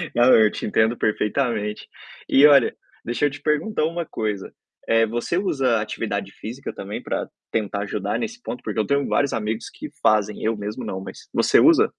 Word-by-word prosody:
não, 120 Hz, +2 st, +6 dB
eu 110 Hz, -1 st, +5 dB
te -, -, -5 dB
entendo 110 Hz, +2 st, +2 dB
perfeitamente. 110 Hz, -1 st, -1 dB, 0.4 s
E, 140 Hz, +2 st, +6 dB
olha, 140 Hz, -5 st, +6 dB, 0.3 s
deixa 120 Hz, +5 st, 0 dB
eu 145 Hz, -, +3 dB
te 140 Hz, -, -10 dB
perguntar 155 Hz, +3 st, 0 dB
uma 170 Hz, +1 st, -2 dB
coisa, 105 Hz, -6 st, -4 dB, 0.3 s
eh, 115 Hz, 0 st, +4 dB
você 120 Hz, +10 st, -2 dB
usa 135 Hz, -, +1 dB
atividade 100 Hz, -2 st, -3 dB
física, 125 Hz, +6 st, -7 dB
também, 100 Hz, +2 st, -6 dB
para -, -, -3 dB, 0.2 s
tentar 105 Hz, -2 st, -1 dB
ajudar 100 Hz, 0 st, -2 dB
nesse 230 Hz, +2 st, -5 dB
ponto? 125 Hz, -, -6 dB
Porque 110 Hz, 0 st, -3 dB
eu 105 Hz, -, +1 dB
tenho 140 Hz, +3 st, +1 dB
vários 140 Hz, -1 st, +1 dB
amigos 110 Hz, 0 st, -3 dB
que -, -, -8 dB
fazem, 105 Hz, -1 st, +2 dB
eu 110 Hz, +1 st, +1 dB
mesmo 105 Hz, +1 st, -5 dB
não, 95 Hz, 0 st, -4 dB
mas -, -, -10 dB
você -, -, +4 dB
usa? -, -, +6 dB
115 Hz, 185 wpm, -23 LUFS, 105-140 Hz, 0.4 s, não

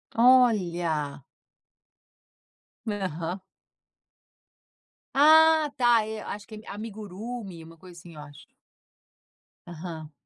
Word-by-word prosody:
Olha. 175 Hz, -, +2 dB, 1.6 s
Aham. 185 Hz, -3 st, -4 dB, 1.7 s
Ah, 315 Hz, +1 st, +5 dB
tá. 240 Hz, -3 st, +4 dB
É, 220 Hz, 0 st, -6 dB
acho 205 Hz, 0 st, -8 dB
que 220 Hz, -, -10 dB
é 215 Hz, +1 st, -13 dB
a -, -, -6 dB
amigurumi, 210 Hz, -2 st, -8 dB
uma 165 Hz, +1 st, -15 dB
coisa 180 Hz, +1 st, -15 dB
assim, 165 Hz, -1 st, -14 dB
eu 150 Hz, -, -9 dB
acho. 145 Hz, -1 st, -14 dB, 1.2 s
Aham. 160 Hz, -2 st, -8 dB
195 Hz, 95 wpm, -26 LUFS, 165-230 Hz, 1.7 s, Ah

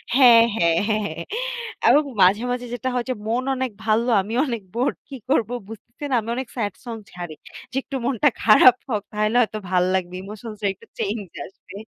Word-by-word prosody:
হ্যাঁ, 240 Hz, -4 st, +8 dB
হ্যাঁ, 170 Hz, -5 st, +3 dB
হ্যাঁ, 215 Hz, -1 st, +1 dB
হ্যাঁ। -, -, -5 dB, 0.6 s
এবং 300 Hz, -, +6 dB, 0.2 s
মাঝে, 195 Hz, +4 st, +5 dB
মাঝে 245 Hz, 0 st, -3 dB
যেটা 250 Hz, +2 st, -2 dB
হয় 245 Hz, -, -1 dB
যে -, -, +1 dB
মন 235 Hz, +3 st, 0 dB
অনেক 260 Hz, -1 st, -2 dB
ভাল। 215 Hz, 0 st, +3 dB, 0.2 s
আমি 205 Hz, +4 st, -7 dB
অনেক 235 Hz, -5 st, -3 dB
বোর 245 Hz, +3 st, +1 dB, 0.2 s
কী 275 Hz, -, -8 dB
করবো 240 Hz, -3 st, +1 dB, 0.2 s
বুঝতেছে 235 Hz, +5 st, -12 dB
না। 255 Hz, -, +3 dB
আমি 220 Hz, -, -8 dB
অনেক 260 Hz, 0 st, -4 dB
স্যাড 205 Hz, -6 st, -2 dB
সং 235 Hz, -2 st, -5 dB, 0.2 s
ছাড়ি। 175 Hz, -3 st, -7 dB, 0.4 s
যে -, -, -10 dB
একটু 275 Hz, -, -7 dB
মনটা 270 Hz, +3 st, +3 dB
খারাপ 230 Hz, +3 st, +7 dB
হোক 210 Hz, -4 st, 0 dB
তাহলে 215 Hz, +2 st, 0 dB
হয়তো 215 Hz, -2 st, -1 dB
ভাল 180 Hz, -1 st, +3 dB
লাগবে। 180 Hz, -1 st, -2 dB
ইমোশনসটা 215 Hz, +1 st, -6 dB
একটু 190 Hz, -, -20 dB
চেঞ্জ 205 Hz, -1 st, -2 dB, 0.2 s
আসবে। 195 Hz, -, -15 dB
225 Hz, 190 wpm, -22 LUFS, 205-245 Hz, 0.6 s, হ্যাঁ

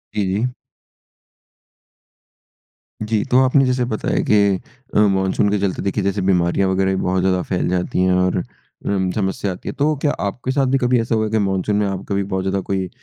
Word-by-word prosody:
जी, 105 Hz, -, +1 dB
जी। 125 Hz, +5 st, -1 dB, 2.5 s
जी। 110 Hz, -1 st, 0 dB
तो 125 Hz, -, +5 dB
आपने 135 Hz, +1 st, +4 dB
जैसे 125 Hz, -1 st, +1 dB
बताया 110 Hz, -3 st, -1 dB
कि 100 Hz, -2 st, +4 dB, 0.4 s
अ, -, -, +5 dB
मानसून 95 Hz, 0 st, +2 dB
के 105 Hz, -, +1 dB
चलते 95 Hz, -2 st, -1 dB
देखिए 100 Hz, +1 st, -1 dB
जैसे 100 Hz, 0 st, 0 dB
बीमारियाँ 95 Hz, 0 st, +2 dB
वगैरह 95 Hz, 0 st, +1 dB
भी -, -, -2 dB
बहुत 95 Hz, 0 st, 0 dB
ज़्यादा 95 Hz, -1 st, +1 dB
फैल 90 Hz, -, -1 dB
जाती 90 Hz, 0 st, -1 dB
हैं 90 Hz, 0 st, +3 dB
और 90 Hz, 0 st, +2 dB, 0.5 s
उम, 95 Hz, -2 st, 0 dB
समस्या 95 Hz, -1 st, -2 dB
आती 90 Hz, -, -7 dB
है। -, -, -4 dB
तो 150 Hz, +2 st, +1 dB
क्या 145 Hz, -, +2 dB
आपके 120 Hz, +6 st, -2 dB
साथ 135 Hz, 0 st, +1 dB
भी 135 Hz, +1 st, +2 dB
कभी 125 Hz, -1 st, +2 dB
ऐसा 115 Hz, 0 st, -1 dB
हुआ 110 Hz, -, +1 dB
है, 110 Hz, -, -4 dB
कि 110 Hz, -, +2 dB
मानसून 95 Hz, +1 st, 0 dB
में 105 Hz, 0 st, +1 dB
आप 95 Hz, -1 st, -4 dB
कभी 100 Hz, 0 st, 0 dB
बहुत 95 Hz, -1 st, -3 dB
ज़्यादा 95 Hz, 0 st, 0 dB
कोई 95 Hz, -2 st, -2 dB
100 Hz, 205 wpm, -20 LUFS, 95-110 Hz, 2.5 s, तो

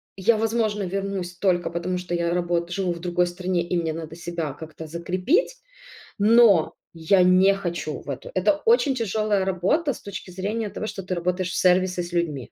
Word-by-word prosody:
я 215 Hz, +4 st, +2 dB
возможно 220 Hz, -2 st, 0 dB
вернусь 190 Hz, -1 st, -3 dB
только 175 Hz, -2 st, +1 dB
потому, 175 Hz, +2 st, -2 dB
что 180 Hz, -1 st, -5 dB
я 170 Hz, 0 st, 0 dB
работ 175 Hz, -1 st, -1 dB
живу 185 Hz, -1 st, -1 dB
в 170 Hz, -, -9 dB
другой 175 Hz, 0 st, +1 dB
стране 180 Hz, 0 st, -2 dB
и 180 Hz, -, -1 dB
мне 160 Hz, -1 st, -2 dB
надо 160 Hz, 0 st, -7 dB
себя 170 Hz, -4 st, -4 dB
как-то 160 Hz, +1 st, -9 dB
закрепить, 185 Hz, -, 0 dB, 0.6 s
но 210 Hz, -5 st, +5 dB, 0.2 s
я 170 Hz, +3 st, +3 dB
не 185 Hz, +2 st, +5 dB
хочу 170 Hz, -6 st, -4 dB
в -, -, -12 dB
эту. 135 Hz, -, -7 dB
Это 185 Hz, +10 st, +3 dB
очень 455 Hz, -, +4 dB
тяжелая 215 Hz, -3 st, 0 dB
работа 195 Hz, -, +1 dB
с -, -, -12 dB
точки 200 Hz, -2 st, -8 dB
зрения 205 Hz, +4 st, -3 dB
того, 215 Hz, -, -5 dB
что 195 Hz, -, -5 dB
ты 185 Hz, 0 st, -3 dB
работаешь 180 Hz, +1 st, -1 dB
в -, -, -4 dB
сервисе 185 Hz, 0 st, +2 dB
с 175 Hz, -, -8 dB
людьми. 155 Hz, -7 st, -2 dB
180 Hz, 185 wpm, -24 LUFS, 170-200 Hz, 0.6 s, но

